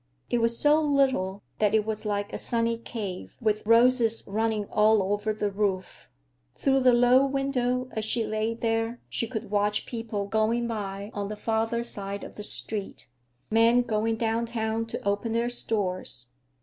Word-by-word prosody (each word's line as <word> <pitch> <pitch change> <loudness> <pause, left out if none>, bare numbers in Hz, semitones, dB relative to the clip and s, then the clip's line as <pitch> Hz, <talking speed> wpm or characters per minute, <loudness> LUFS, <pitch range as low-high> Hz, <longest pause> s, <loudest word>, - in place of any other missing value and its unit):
It 240 - +2
was 230 0 +1
so 300 +1 +4
little 265 -10 +1 0.2
that 210 0 +3
it 215 -1 +2
was 215 0 -3
like 205 -1 -2
a - - -3
sunny 230 -1 0
cave, 205 -6 -6
with 215 -3 0
roses 230 0 +4
running 215 0 0
all 210 -2 +3
over 205 +1 -1
the 210 -1 -2
roof. 195 -2 -2 0.5
Through 270 0 +2
the 255 -1 +5
low 245 +2 +5
window, 255 -2 0
as 220 - -3
she 225 +1 +1
lay 215 +1 -1
there, 225 +1 -1
she 230 - -1
could 220 -3 -6
watch 210 0 +1
people 225 -4 -4
going 220 +3 +1
by 200 -2 -5
on 200 -1 -3
the 210 - -5
farther 225 +2 -1
side 200 -3 -3
of - - -9
the - - -8
street; 205 - -4 0.4
men, 230 +2 +5
going 225 0 0
downtown 225 0 -1
to 225 - -6
open 205 +3 0
their 235 +1 0
stores. 185 - -3
220 Hz, 165 wpm, -27 LUFS, 210-235 Hz, 0.5 s, the